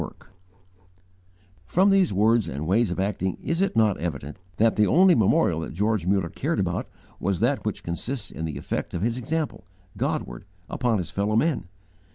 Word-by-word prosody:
'_ - - -5 1.6
From 190 +3 +4
these 195 -3 +4
words 110 +1 +3
and 70 +1 -4
ways 105 +5 +2
of 90 - -3
acting, 95 -1 -1
is 165 +2 -1
it 195 - +1
not 110 -3 +3
evident, 75 -2 -5 0.2
that 115 +1 +3
the 105 -1 +3
only 185 +1 +6
'memorial' 155 - +3
that 80 - -5
George 105 -1 0
Muller 95 -3 +1
cared - - -2
about - - -2 0.3
was 95 -1 -1
that - - +1
which - - -3
consists 110 +8 -4
in 80 - -5
the 80 - -4
effect - - -4
of 85 - -2
his 115 +1 0
example, 150 -1 -3 0.3
Godward, - - -3 0.2
upon 120 -3 0
his 85 -4 -4
fellow 100 +2 0
men? 130 - +1
105 Hz, 180 wpm, -25 LUFS, 85-120 Hz, 1.6 s, only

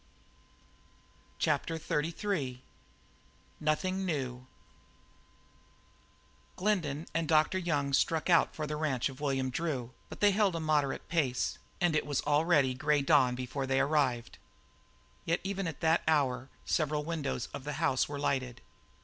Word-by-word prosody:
CHAPTER 165 - 0
XXXIII 150 -4 -2 1.0
NOTHING 185 +5 0
NEW 130 -7 -3 2.1
Glendin 170 -7 0
and 165 -1 0
Dr. 155 +4 +3
Young 145 -6 -1
struck 160 +3 +2
out 170 -2 +4
for 155 - -3
the 150 0 -3
ranch 140 -5 0
of 135 +1 -11
William 135 -3 0
Drew, 130 -5 -2 0.2
but - - -9
they 205 -1 +5
held 200 -3 +2
a - - -1
moderate 150 -3 0
pace, 140 -7 0 0.2
and 175 -3 +2
it 150 - 0
was 145 -2 0
already 145 -2 +3
grey 145 +2 +1
dawn 125 -2 +4
before 130 +2 -4
they 135 0 +2
arrived; 135 -6 0 0.9
yet 165 - +1
even 195 -1 -2
at 160 - -6
that 160 +1 +3
hour 135 -4 +1 0.2
several 150 -1 0
windows 150 -7 -2
of - - -6
the 145 +1 -4
house 145 -3 +1
were 145 - -4
lighted. 130 -4 -1
150 Hz, 135 wpm, -31 LUFS, 135-165 Hz, 2.1 s, they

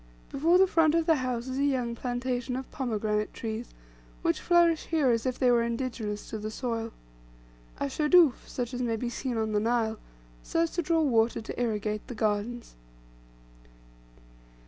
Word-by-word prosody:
Before 330 +6 +3
the 380 - +6
front 325 -4 +3
of 330 -1 +2
the 325 -2 +4
house 250 -2 -2
is 260 +1 -3
a - - +2
young 255 -4 0
plantation 245 +1 -3
of 260 0 -6
pomegranate 215 -4 -2
trees, 225 +1 -5 0.5
which - - +1
flourish 340 -2 +3
here 305 -6 +2
as 230 +2 0
if 255 - -1
they 250 -2 +3
were 240 -1 +4
indigenous 230 -3 -3
to 220 - -4
the 215 +1 -4
soil. 230 -1 -3 0.9
A - - 0
shadoof, 300 +1 +4
such 245 0 -4
as 250 - -3
may 235 -2 0
be 240 +2 -3
seen 245 0 -3
on 220 -1 -1
the 210 - +2
Nile, 225 0 0 0.4
serves 330 0 0
to 345 - -1
draw 325 0 +2
water 230 -5 +2
to 225 - -5
irrigate 215 -2 -2
the 245 - -7
gardens. 215 +3 -2
245 Hz, 170 wpm, -28 LUFS, 225-275 Hz, 0.9 s, the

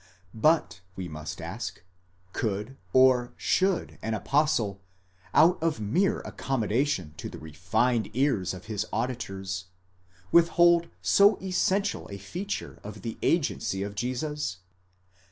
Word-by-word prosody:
But 110 - +2
we 95 -2 -5
must 75 0 -7
ask, 95 +2 -6 0.5
could 105 +4 -2 0.2
or 130 -2 +4
should 190 -1 0
an 110 0 -1
apostle, 115 -5 +1 0.5
out 175 +1 +5
of 160 -6 0
mere 165 - +1
accommodation 115 - -1
to 80 - -6
the - - -9
refined 105 +9 0
ears 120 -10 +1
of 90 - -11
his 105 -2 -2
auditors, 95 -6 -3 0.7
withhold 170 0 +5 0.2
so 200 +1 +6
essential 190 +2 0
a 100 - -6
feature 175 - -5
of 105 -1 -9
the 115 - -5
agency 140 - 0
of 100 0 -5
Jesus? 130 - -3
115 Hz, 120 wpm, -28 LUFS, 95-155 Hz, 0.7 s, so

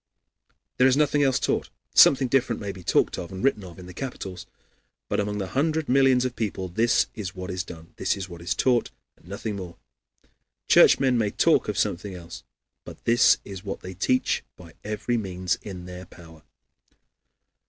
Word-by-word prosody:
There 125 - +5
is 130 +1 +3
nothing 145 -1 +2
else 135 -2 +3
taught. - - -1 0.2
Something 135 -1 +6
different 125 -3 +1
may 100 -1 -4
be 95 -1 -12
talked - - +1
of 85 - -7
and 95 +1 -6
written 135 -7 +1
of 85 -3 -11
in 90 - -10
the 90 - -10
capitals; 95 -6 -6 0.6
but - - -1
among 105 0 -2
the 95 -2 -4
hundred 155 - 0
millions 130 -1 +4
of 130 - -1
the - - -34
people 95 -4 -3
this 115 +6 +2
is 100 -4 -6
what 90 +1 -6
is 90 +1 -3
done, 80 -2 -12
this - - 0
is 95 -2 -5
what 85 -2 -10
is 85 0 -2
taught, 120 +1 +2 0.3
and - - -23
nothing 100 +2 -5
more. 90 -3 -8 0.9
Churchmen 130 -3 +5
may 105 -2 +1
talk - - +2
of - - -3
something 95 +2 -1
else, 85 -1 -10 0.4
but - - -12
this 120 +2 +5
is 95 -1 -8
what 100 -2 -5
they 95 - -8
teach 130 +8 0
by 85 -3 -14
every 105 +3 -2
means 90 -4 -2
in 90 -4 -8
their 90 0 -9
power. 80 -3 -15
100 Hz, 190 wpm, -25 LUFS, 90-125 Hz, 0.9 s, Something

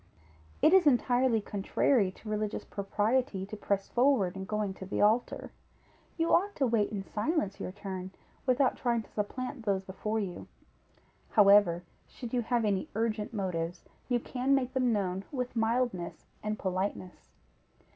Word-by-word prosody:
It 320 - +6
is 375 -4 +6
entirely 245 -3 +3
contrary 205 +2 +1
to 220 - -14
religious 215 0 -2
propriety 210 +1 0
to 205 - -7
press 200 -1 -1
forward, 240 -8 +2
in 190 0 -5
going 210 -1 -2
to 190 - -9
the - - -2
altar; 220 +4 +2 0.7
you 330 0 +2
ought 405 +3 +3
to 275 - +2
wait 225 -4 +2
in 200 -2 -3
silence 210 - -1
your - - -4
turn, 190 -2 -6 0.4
without 255 +1 +3
trying 235 -2 0
to - - -21
supplant 250 +4 -4
those 195 -3 0
before 215 +3 -3
you; 190 -4 -5 0.9
however, 200 -5 +6 0.2
should 240 -1 -9
you 245 - +2
have 235 0 0
any 195 -3 0
urgent 220 -1 -1
motives, 180 -5 -3 0.3
you 245 -1 +2
can 260 +3 +1
make 260 -1 -1
them 255 -2 +2
known 190 -3 -1
with 250 -3 -3
mildness 225 -5 -1 0.2
and 215 0 -2
politeness. 185 -1 -3
215 Hz, 155 wpm, -30 LUFS, 195-245 Hz, 0.9 s, It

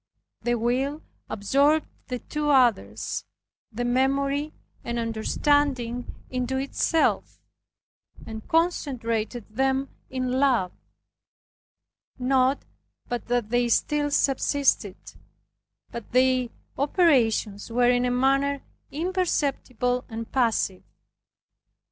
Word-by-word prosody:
The 240 0 +1
will, 260 +6 -1 0.3
absorbed 280 +9 +2 0.2
the 250 - -3
two 300 +4 -3
others, 220 - +2 0.5
the 245 +3 -3
memory 275 +4 +1 0.3
and 235 0 -3
understanding 245 +2 0 0.2
into 255 +1 -1
itself, 280 +4 0 0.9
and 220 -1 -8
concentrated 245 - 0
them 265 +4 0 0.2
in 255 -1 -2
LOVE; 250 -10 +2 1.5
not 260 +1 +2 0.4
but 240 -1 -3
that 240 -3 0
they 240 0 +2
still 290 +5 +1
subsisted, 270 -7 +1 0.9
but 235 -2 -8
their 255 0 +3 0.3
operations 250 - +2
were 245 +1 +3
in 245 0 +2
a 250 - +1
manner 275 +2 +1 0.3
imperceptible 280 - -1
and 225 0 -6
passive. 225 -7 +1
255 Hz, 90 wpm, -25 LUFS, 235-280 Hz, 1.5 s, their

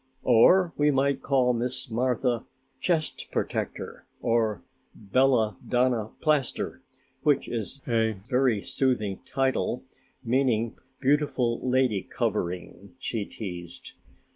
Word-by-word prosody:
"Or 165 +9 +5
we 150 0 +4
might 140 0 +2
call 130 -3 +2
Miss 125 +3 -1
Martha 125 0 0 0.3
'Chest 160 0 -1
Protector' - - -3
or 110 -6 +1 0.3
'Bella 110 -1 +2
Donna 120 -3 +1
Plaster', 150 -5 0 0.4
which 145 -2 +2
is 120 +4 -5
a 115 -2 +2
very 125 -5 +2
soothing 110 -8 0
title, 135 -1 0 0.4
meaning 120 -2 +1 0.3
'Beautiful 135 -4 +2
Lady 125 -5 +2
Covering'," 100 -2 -3
she 115 -5 -3
teased. 90 -6 -8
125 Hz, 100 wpm, -27 LUFS, 110-135 Hz, 0.4 s, Or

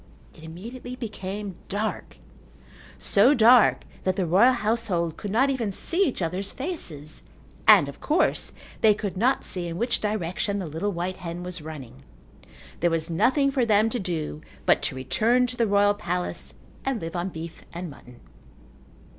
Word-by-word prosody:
It - - -16
immediately 235 +10 -8
became 205 -5 -6
dark, 210 +2 -3 0.8
so 245 +9 +4
dark 235 +1 +6 0.2
that 185 -1 +1
the 190 - 0
royal 200 +10 +5
household 210 -8 -1
could 205 - -6
not 255 +7 +3
even 235 -6 -1
see 345 - +1
each 235 - -3
other's 185 +4 -1
faces 175 - -4 0.5
and, 145 - +8
of 140 - -9
course, 310 - +1 0.3
they 215 -2 +6
could 200 -2 -4
not 245 +8 +2
see 180 -2 0
in 165 0 -5
which 235 +5 0
direction 200 -1 -1
the 190 - -3
little 160 +7 -2
white 180 +1 -3
hen 175 -1 -6
was 180 -2 -6
running. 135 -5 -9 0.8
There 175 - +3
was 165 0 -1
nothing 275 - +3
for 265 -2 +1
them 220 0 +3
to 245 - -2
do 160 -5 -3 0.2
but - - +4
to 130 - -1
return 230 - +2
to 250 0 -4
the 235 -2 +1
royal 205 0 +4
palace 180 -3 -4 0.3
and 270 -4 -1
live 165 0 -6
on 175 +2 -2
beef 165 -1 -8
and 175 -1 -6
mutton. 125 -3 -15
195 Hz, 165 wpm, -25 LUFS, 170-230 Hz, 0.8 s, and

